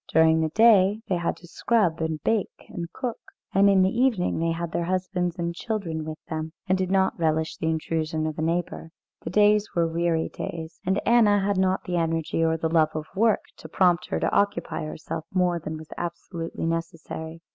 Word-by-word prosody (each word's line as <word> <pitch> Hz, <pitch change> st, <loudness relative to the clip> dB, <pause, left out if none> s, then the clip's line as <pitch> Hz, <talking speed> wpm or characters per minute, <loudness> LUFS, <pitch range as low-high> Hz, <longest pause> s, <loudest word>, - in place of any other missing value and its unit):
During 160 Hz, 0 st, +5 dB
the 160 Hz, -, +1 dB
day 210 Hz, +1 st, +5 dB
they 185 Hz, -, +2 dB
had 170 Hz, -1 st, -2 dB
to 175 Hz, -, -15 dB
scrub 185 Hz, -4 st, +1 dB
and 160 Hz, -1 st, -1 dB
bake 220 Hz, -3 st, -1 dB
and 170 Hz, -4 st, -6 dB
cook, 245 Hz, -3 st, -4 dB, 0.3 s
and 200 Hz, +1 st, +5 dB
in 195 Hz, -1 st, +5 dB
the 190 Hz, +4 st, +1 dB
evening 235 Hz, -10 st, +1 dB
they 165 Hz, 0 st, +1 dB
had 165 Hz, 0 st, -3 dB
their 170 Hz, -, -1 dB
husbands 180 Hz, -1 st, -1 dB
and 170 Hz, -1 st, -2 dB
children 170 Hz, -6 st, -3 dB
with 155 Hz, 0 st, -5 dB
them, 160 Hz, 0 st, -4 dB
and 185 Hz, -, +3 dB
did 185 Hz, -1 st, -1 dB
not 190 Hz, -1 st, +2 dB
relish 160 Hz, -1 st, 0 dB
the 160 Hz, -, -1 dB
intrusion 160 Hz, 0 st, -1 dB
of 155 Hz, 0 st, -4 dB
a -, -, 0 dB
neighbour. 165 Hz, 0 st, -2 dB, 0.3 s
The -, -, -5 dB
days 210 Hz, +2 st, +4 dB
were 170 Hz, -1 st, +3 dB
weary 165 Hz, 0 st, 0 dB
days, 165 Hz, 0 st, -7 dB
and 190 Hz, +2 st, +2 dB
Anna 215 Hz, -4 st, +5 dB
had 200 Hz, -2 st, +1 dB
not 190 Hz, 0 st, +1 dB
the 175 Hz, -1 st, -2 dB
energy 165 Hz, -1 st, 0 dB
or 160 Hz, 0 st, +2 dB
the 160 Hz, -, -1 dB
love 160 Hz, -1 st, +2 dB
of 155 Hz, -1 st, -3 dB
work 220 Hz, +2 st, +3 dB, 0.2 s
to -, -, -11 dB
prompt 180 Hz, -2 st, +2 dB
her -, -, -1 dB
to -, -, 0 dB
occupy 170 Hz, -6 st, 0 dB
herself 155 Hz, +1 st, -5 dB
more 180 Hz, -2 st, +2 dB
than 155 Hz, 0 st, -5 dB
was 155 Hz, 0 st, -11 dB
absolutely 170 Hz, -1 st, -5 dB
necessary. 165 Hz, -1 st, -4 dB
170 Hz, 200 wpm, -25 LUFS, 160-190 Hz, 0.3 s, During